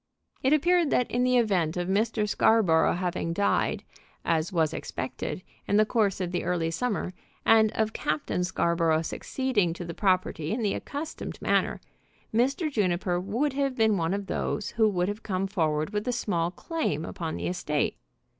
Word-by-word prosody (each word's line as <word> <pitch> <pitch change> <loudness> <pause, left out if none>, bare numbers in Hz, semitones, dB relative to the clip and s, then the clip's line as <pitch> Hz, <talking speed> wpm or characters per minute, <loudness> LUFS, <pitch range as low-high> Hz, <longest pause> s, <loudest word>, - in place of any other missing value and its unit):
It 265 - +2
appeared 335 +2 +4
that 250 - +1
in 245 +1 +1
the 250 0 +3
event 185 -8 +1
of 175 0 -1
Mr. 215 +2 +1
Scarborough 200 -7 +4
having 175 -2 -2
died, 200 +3 +1 0.4
as 160 0 +1
was 160 -3 +1
expected, 155 +7 -4 0.2
in 205 - +3
the 215 - +5
course 210 -4 +1
of 180 -2 -2
the 175 - -1
early 165 -2 0
summer, 205 -2 -2 0.3
and 220 -1 +5
of 220 0 0
Captain 155 +3 -1
Scarborough 170 -3 +1
succeeding 210 -3 -1
to 175 +1 -7
the 170 - -5
property 185 -5 0
in 230 0 -2
the 205 - +1
accustomed 300 +3 -5
manner, - - +1 0.5
Mr. 275 +7 +1
Juniper 180 -5 0
would 235 +10 -1
have 275 -1 0
been 220 -3 +3
one 170 +1 0
of 200 0 -4
those 205 +1 -2
who 220 -2 +3
would 180 -3 0
have 205 +2 -4
come 190 -1 -1
forward 160 -4 0
with 210 +2 -2
a - - +2
small 175 -8 0
claim 180 - -2
upon 165 -1 -4
the - - -4
estate. 150 -4 -1
195 Hz, 175 wpm, -27 LUFS, 170-230 Hz, 0.5 s, the